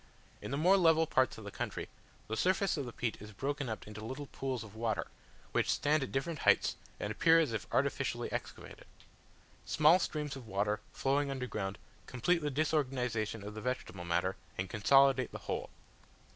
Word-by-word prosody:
In - - -6
the 140 - -1
more 180 +6 +5
level 165 -3 +5
parts 130 -5 +2
of 110 - -9
the 100 - -7
country, - - -4 0.4
the 110 - -2
surface 190 - +2
of 140 -5 -3
the - - -5
peat 115 -3 -3
is 105 +1 -10
broken 140 +4 -2
up 110 - -5
into 105 0 -8
little 130 +6 -5
pools 130 -4 -4
of 110 -2 -12
water, 110 0 -1 0.5
which - - +1
stand 150 +1 +2
at 135 - -3
different 140 +3 -2
heights, - - +4 0.2
and 105 - -2
appear 165 +9 +5
as 155 -8 +1
if 110 - -3
artificially - - 0
excavated. - - -6 0.8
Small 155 +4 +5
streams 150 -5 -2
of 130 -4 -9
water, 105 +1 0
flowing 140 +1 +1
underground, 110 -8 -3 0.3
complete 165 +8 +1
the 150 - -1
disorganization 130 -7 0
of 105 +1 -6
the 110 - -6
vegetable 125 -7 -3
matter, 90 +2 0 0.2
and 95 -1 -3
consolidate 135 +3 +4
the - - -6
whole. - - -4
130 Hz, 180 wpm, -33 LUFS, 110-150 Hz, 0.8 s, more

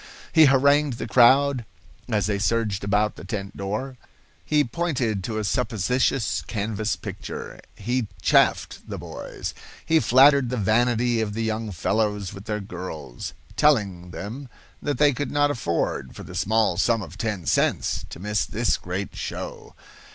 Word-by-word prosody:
He 160 -1 +8
harangued 140 +1 +4
the - - -4
crowd 130 +1 +5 0.5
as 105 -3 +1
they 100 -1 0
surged 105 -2 0
about 105 +1 +1
the - - -9
tent 100 0 -5
door. 110 +7 -4 0.5
He 150 -1 +3
pointed 125 - -1
to 110 -2 -3
a 110 - -1
suppositious 125 +4 0
canvas 110 0 -2
picture. - - -7
He 120 +2 -1
"chaffed" - - +3
the - - -4
boys. - - -6 0.3
He 160 0 +4
flattered 135 -1 +5
the 125 - -2
vanity 120 +2 +2
of 105 -2 -3
the 115 - -1
young 110 -1 -2
fellows 105 +2 -1
with 100 +1 -10
their 105 -2 -2
girls, 90 -9 -7 0.2
telling 100 -12 +2
them 115 +9 -7 0.3
that 145 -1 -1
they 145 -1 +4
could 140 +1 -3
not 145 0 +2
afford, 85 - -2
for - - -8
the - - -10
small 110 -3 +1
sum 115 +2 +2
of 85 -1 -10
ten 105 -5 -3
cents, - - +1
to - - -9
miss 105 +2 -1
this 115 +1 +1
great 90 +2 -5
show. - - -6
110 Hz, 155 wpm, -24 LUFS, 100-130 Hz, 0.5 s, He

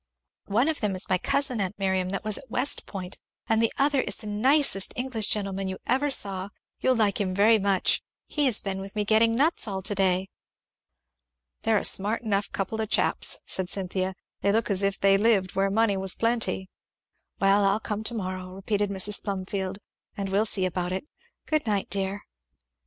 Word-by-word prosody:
"One 225 +7 +2
of 320 -2 -1
them 205 -3 0
is 185 - -1
my 185 - +3
cousin, 260 -3 0
aunt 190 +1 -3
Miriam, 190 -2 0
that 195 - -2
was 215 -1 -1
at 265 - -15
West 250 +4 -1
Point, 190 -2 -6 0.3
and 225 0 +2
the 230 - +3
other 280 -1 +3
is - - -3
the - - -9
nicest 215 0 +2
English 245 -4 -1
gentleman 195 -2 -1
you 190 0 -4
ever 270 +4 +1
saw 195 -6 -1 0.3
you - - +1
will 255 - +4
like 210 -2 +2
him 185 -2 -1
very 215 +3 +5
much 195 -2 +2 0.2
he 295 -2 +1
has 235 -5 +1
been 195 -1 -3
with 195 +2 -8
me 210 -1 0
getting 225 +2 +4
nuts 290 -1 +2
all 190 -2 -4
to 205 +2 +1
day." 190 -1 +1 1.3
"They're 220 -1 +2
a - - -1
smart 210 +5 +2
enough 200 -2 -1
couple 210 +3 -2
of 220 - -3
chaps," - - +2
said 185 -1 -1
Cynthia; 190 -1 -2 0.2
"they 200 - +2
look 220 0 +1
as 195 -1 +2
if 195 0 0
they 195 0 +5
lived 200 -4 +2
where 195 0 +2
money 205 0 +2
was 190 -1 -1
plenty." 230 -4 0 0.7
"Well 200 +1 +4
I'll 195 +2 +3
come 215 -1 -4
to 235 - -1
morrow," 185 -2 -5
repeated 205 +1 -1
Mrs. 200 +1 +1
Plumfield, 195 -1 -3 0.4
"and 200 -1 -3
we'll 205 +3 +2
see 190 -3 +1
about 180 0 -2
it. 190 +8 -3 0.4
Good 310 -4 0
night, 205 -4 -1
dear!" 195 +1 -1
200 Hz, 195 wpm, -26 LUFS, 190-225 Hz, 1.3 s, very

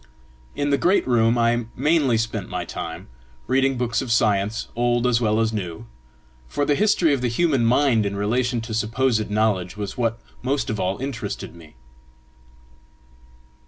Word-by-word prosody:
In 145 0 -1
the 140 - +2
great 185 -3 +2
room 115 -1 +3
I 120 0 +2
mainly 145 -4 +2
spent 110 -2 -3
my 90 -1 -3
time, - - -6 0.4
reading 135 +1 +1
books 120 -2 0
of 130 -3 -4
science, 105 -1 +1
old 120 0 +1
as 125 -1 +2
well 110 -1 +2
as 115 0 +1
new; 95 0 -5 0.6
for 145 - -1
the 145 - +2
history 185 -4 +3
of 135 - -1
the 125 - +1
human 135 +1 +1
mind 125 -2 +3
in 100 0 -2
relation 120 +4 0
to 115 0 -6
supposed 110 0 0
knowledge 105 -3 0
was 105 +2 -5
what 115 -1 0 0.2
most 135 0 -1
of 110 - -3
all 95 +1 -1
interested 135 -9 -5
me. 80 -5 -15
115 Hz, 160 wpm, -23 LUFS, 110-130 Hz, 0.6 s, room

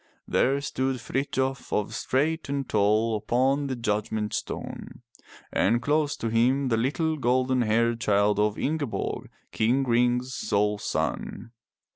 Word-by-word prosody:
There 135 +2 +2
stood 130 -1 -1
Frithjof 135 +2 -2 0.2
straight 155 +4 -1
and 140 -1 -2
tall 110 +2 +2
upon 130 +6 +1
the 130 - -2
judgment 105 -2 -2
stone, - - -6 0.5
and 115 +4 +3
close 145 +2 +1
to 115 - -2
him 125 +4 +2
the 115 - +2
little 155 +6 0
gold 130 0 +1
haired 115 +1 +1
child 105 -1 +2
of 105 0 +1
Ingeborg, 145 -4 -2 0.2
King 125 +5 +2
Ring's 125 +1 +1
sole 105 -2 0
son. 115 +2 -3
120 Hz, 125 wpm, -26 LUFS, 110-135 Hz, 0.5 s, and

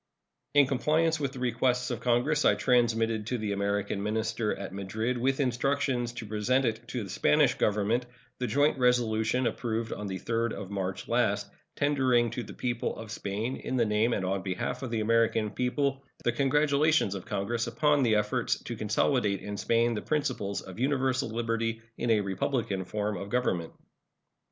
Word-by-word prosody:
In 145 -1 +7
compliance 155 +4 +1
with 140 -2 -2
the - - -9
request 125 +1 0
of 120 - -2
Congress, 125 +5 +2
I - - +5
transmitted 115 -3 +2
to 125 - -1
the 110 -2 -2
American 100 0 -1
minister 110 +1 -1
at 95 -1 -6
Madrid, 110 +5 -2
with 135 +3 0
instructions 130 -1 0
to 120 -2 -6
present 110 +5 +1
it 115 0 -2
to 120 -2 -3
the 100 - -8
Spanish 150 -4 +3
Government, 105 +4 +1 0.3
the 125 - -1
joint 145 +5 +2
resolution 125 -1 +2
approved 115 -1 -2
on 105 - -5
the 95 -1 -3
3d 115 0 -1
of 100 -1 -7
March 95 -2 -3
last, - - +1 0.2
tendering 130 -5 +2
to 125 - -3
the - - -9
people 120 -1 -2
of 110 -1 -8
Spain, 110 +4 -3
in 130 - -4
the 120 - +3
name 105 +2 +2
and 95 - -1
on 95 +1 0
the 95 0 -3
behalf - - -3
of 130 - -4
the 115 -2 -1
American 115 -1 +2
people, 135 +2 0 0.2
the 120 - +2
congratulations 145 -3 +2
of 95 -2 -6
Congress 115 +4 -2
upon 150 -2 +2
the 115 -4 +3
efforts 105 +4 +1
to 120 - -5
consolidate 110 -1 +1
in 105 0 -4
Spain 115 +3 +2
the 105 - -3
principles 130 -10 -1
of 95 +2 -10
universal 130 -1 +1
liberty 115 0 -1 0.2
in 120 - -2
a 110 -2 +4
republican 100 0 -1
form 105 +2 -2
of 100 +3 -6
government. 95 -9 0
115 Hz, 180 wpm, -29 LUFS, 105-130 Hz, 0.3 s, In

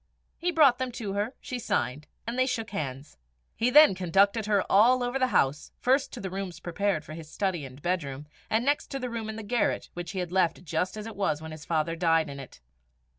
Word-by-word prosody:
He 350 - 0
brought 280 -7 +5
them 255 -1 -2
to 210 -5 -4
her, 210 +5 -2
she 255 -3 -5
signed, 140 - -1 0.2
and 235 - -3
they 255 +1 +2
shook 225 -4 -2
hands. 140 -6 -5 0.4
He 235 - +2
then 300 -2 +8
conducted 195 +4 +2
her 205 -2 +3
all 245 +5 +5
over 245 +2 -1
the 255 - +3
house 150 - +1
first 265 +3 +2
to 245 - -6
the 190 -3 -5
rooms 190 -3 -5
prepared 175 -2 -1
for 155 - -8
his 160 -1 -9
study 185 -7 -1
and 130 0 -11
bedroom, 150 -5 -2 0.2
and 225 +3 +1
next 290 +1 +1
to 275 - -4
the 250 -2 -4
room 225 -2 -4
in 220 - -5
the 220 - -6
garret, 235 +2 0
which 175 +1 -6
he - - -6
had 180 -2 -3
left 180 -2 +1
just 175 +6 -1
as 215 - -6
it 225 -1 -7
was 195 -6 0
when 160 0 -8
his 155 0 -9
father 165 0 0
died 165 -2 +2
in 140 - -8
it. 130 - -11
195 Hz, 230 wpm, -28 LUFS, 160-235 Hz, 0.4 s, then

